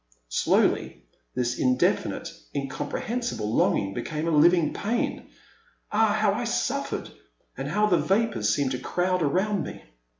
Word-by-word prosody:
Slowly - - +1 0.3
this 120 0 -1
indefinite, 125 0 +1 0.2
incomprehensible 140 - -3
longing 100 -3 +2
became 155 +8 -3
a - - +1
living 165 +1 +4
pain. 230 +4 -2 0.6
Ah, 215 0 +3
how 215 -1 +2
I 235 +4 -2
suffered! 255 +4 -2 0.2
— - - -43
and - - -4
how 210 0 +2
the 180 -5 +3
vapours 195 - +1
seemed 130 +5 +1
to 125 - -2
crowd 180 0 0
around 190 +7 +1
me. - - -8
175 Hz, 135 wpm, -26 LUFS, 135-215 Hz, 0.6 s, living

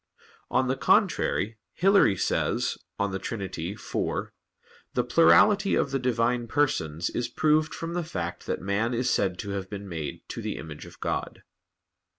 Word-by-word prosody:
On 130 - +2
the 130 - +1
contrary, 110 -4 +2
Hilary 195 - +4
says - - 0 0.2
(De 100 -1 -1
Trin. 115 - -4
iv): 95 0 -6 1.0
"The - - +2
plurality 190 - +5
of 140 - +1
the 135 - 0
Divine 120 -1 +1
Persons 110 - 0
is 120 - -1
proved 155 +4 +2
from 165 0 -5
the 175 0 -1
fact 90 - -5
that - - -2
man 105 +6 0
is 125 +2 +1
said 95 -3 +1
to 100 0 -5
have 95 -1 -4
been 100 -1 -6
made 80 -6 -6
to - - -5
the - - -3
image 75 -1 -8
of - - -15
God." - - -3
110 Hz, 160 wpm, -27 LUFS, 95-135 Hz, 1.0 s, plurality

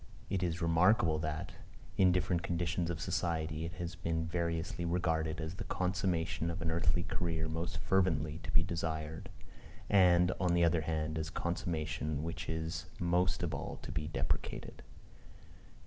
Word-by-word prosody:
It 95 -3 +1
is 85 -1 -1
remarkable 85 -1 +4
that, 80 +4 -3 0.4
in 95 -1 +5
different 90 -1 +1
conditions 85 0 -1
of 85 -2 -2
society 80 -3 -1
it 85 - -5
has 85 0 -4
been 85 -1 -1
variously 85 0 -2
regarded 80 -2 0
as 80 +1 -3
the 95 - -5
consummation 90 -3 0
of 85 +1 -3
an 80 -1 0
earthly 85 +1 +2
career 80 -3 -1
most 85 +1 -3
fervently 80 -5 +1
to - - -8
be 80 - +4
desired, 80 -2 -3 0.6
and, 90 -2 +6
on 90 -2 +2
the 85 - +4
other 85 0 +3
hand, 80 0 -1
as 80 - -2
that - - -15
consummation 80 -4 -2
which 85 0 -4
is 80 0 -3
most 90 +1 +2
of 85 -3 -1
all 70 - -4
to - - -6
be 75 - -2
deprecated. 80 - -2
85 Hz, 160 wpm, -34 LUFS, 80-90 Hz, 0.6 s, and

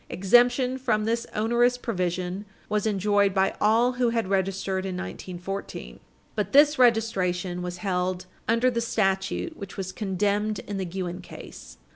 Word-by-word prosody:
Exemption 245 +6 +3
from 215 -5 0
this 230 +1 -1
onerous 240 +3 +2
provision 185 -4 -2 0.3
was 210 0 0
enjoyed 205 -1 +2
by 190 0 +2
all 230 +4 +4
who 250 -1 +1
had 230 -4 -1
registered 190 0 -1
in 190 -1 -4
1914. 180 - -6 0.3
But 210 +4 -2
this 295 +1 +6
registration 190 -7 +2
was 180 0 -5
held 180 -1 -2 0.2
under 230 +3 +3
the 235 -1 -1
statute 195 - -1
which 200 -5 -9
was 190 -1 -4
condemned 205 +2 -1
in 205 0 -6
the 190 - -2
Guinn 180 0 -4
case. 65 - -11
200 Hz, 145 wpm, -26 LUFS, 185-230 Hz, 0.3 s, this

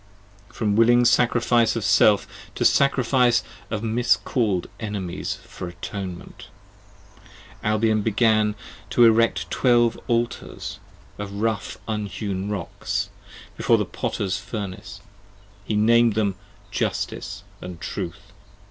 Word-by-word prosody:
20 - - -19
From 105 -2 +1
willing 120 +2 +5
sacrifice 120 -1 +3
of 115 - -2
Self, 105 0 +5 0.3
to - - -1
sacrifice 125 -3 +3 0.3
of 110 -1 -3
(miscall'd) 115 -3 +1
Enemies 100 -5 -4
For 90 - -8
Atonement: 95 0 -7 1.2
Albion 110 0 +2
began 110 -1 +2 0.3
to 120 - +5
erect 115 0 +3
twelve 120 -2 +3
Altars, 120 -1 -2 0.4
Of 100 -1 -5
rough 105 -1 -2
unhewn 100 -2 -3
rocks, 100 +1 -3 0.4
before - - +3
the - - 0
Potter's 95 -2 -2
Furnace. 100 -1 -7 0.6
He 105 - -1
nam'd 115 +1 +4
them 105 -3 +1 0.4
Justice, 100 +1 -3 0.2
and 90 -2 -8
Truth. 90 0 -5
110 Hz, 105 wpm, -23 LUFS, 100-115 Hz, 1.2 s, willing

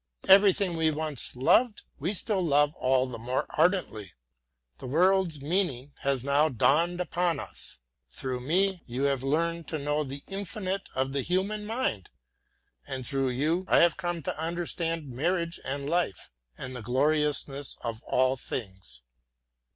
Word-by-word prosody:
Everything 195 -2 +6
we 160 -1 +2
once 155 -4 -2
loved 210 - +3 0.2
we 165 +7 -1
still 205 0 0
love 145 -3 +3
all 130 -2 +2
the 125 -3 -7
more 125 +3 -1
ardently. 110 - 0 0.7
The - - -7
world's 175 +2 +2
meaning 145 -4 -1
has 135 -3 0
now 140 +3 +3
dawned 165 +7 +2
upon 175 -1 0
us. - - -7 0.3
Through 130 - -4
me 180 +7 +1
you 125 +3 -3
have 140 -2 +1
learned 165 +3 -1
to 160 - -3
know 150 +1 0
the 140 0 -7
infinitude 195 0 -4
of 135 +1 -1
the 140 - 0
human 195 +7 -1
mind, 220 - -2 0.8
and 130 -2 -4
through 135 0 0
you 155 +8 0
I - - +4
have 170 -1 +5
come 175 -2 -3
to 145 - -4
understand 165 -1 -2
marriage 170 +6 -1
and 140 +1 -4
life, 170 - -1 0.3
and 130 0 -6
the 125 - -6
gloriousness 145 +2 0
of 115 -1 -4
all 130 +1 +2
things. 95 - -6
150 Hz, 150 wpm, -28 LUFS, 130-175 Hz, 0.8 s, Everything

